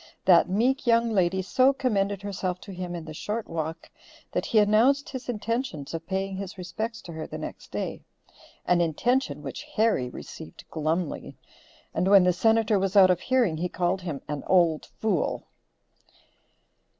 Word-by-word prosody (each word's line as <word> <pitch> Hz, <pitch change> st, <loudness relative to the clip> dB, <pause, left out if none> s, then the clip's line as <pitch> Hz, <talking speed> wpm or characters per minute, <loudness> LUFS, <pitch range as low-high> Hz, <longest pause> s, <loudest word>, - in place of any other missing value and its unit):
That 180 Hz, -1 st, +6 dB
meek 245 Hz, +7 st, +1 dB
young 230 Hz, 0 st, +4 dB
lady 190 Hz, -2 st, +1 dB
so 260 Hz, +7 st, +4 dB
commended 200 Hz, -7 st, 0 dB
herself 190 Hz, -3 st, -3 dB
to 200 Hz, -, -9 dB
him 180 Hz, -1 st, -5 dB
in 165 Hz, -2 st, -6 dB
the 155 Hz, -, -8 dB
short 210 Hz, +8 st, -4 dB
walk, 160 Hz, 0 st, -5 dB, 0.4 s
that -, -, -2 dB
he 225 Hz, -, +1 dB
announced 225 Hz, +7 st, +4 dB
his 260 Hz, -2 st, -7 dB
intentions 230 Hz, -, -3 dB
of 165 Hz, 0 st, -5 dB
paying 195 Hz, 0 st, -2 dB
his 195 Hz, 0 st, -6 dB
respects 215 Hz, +6 st, -5 dB
to 170 Hz, -, -9 dB
her 160 Hz, 0 st, -6 dB
the -, -, -6 dB
next -, -, -8 dB
day, -, -, -4 dB, 0.6 s
an 175 Hz, -1 st, +3 dB
intention 245 Hz, -, 0 dB
which -, -, -6 dB
Harry 215 Hz, -, +2 dB
received 80 Hz, -8 st, -10 dB
glumly; 160 Hz, +1 st, -2 dB, 0.6 s
and 180 Hz, -, 0 dB
when 195 Hz, -1 st, +7 dB
the 180 Hz, 0 st, +3 dB
Senator 220 Hz, +2 st, +3 dB
was 195 Hz, +1 st, -1 dB
out 190 Hz, -2 st, +8 dB
of 180 Hz, -, +1 dB
hearing 240 Hz, -8 st, +1 dB
he 180 Hz, +3 st, -2 dB
called 185 Hz, +2 st, -1 dB
him 160 Hz, -6 st, -5 dB
"an 150 Hz, -1 st, -4 dB
old 170 Hz, -4 st, +3 dB
fool." 205 Hz, -7 st, -1 dB
190 Hz, 165 wpm, -26 LUFS, 175-225 Hz, 0.6 s, out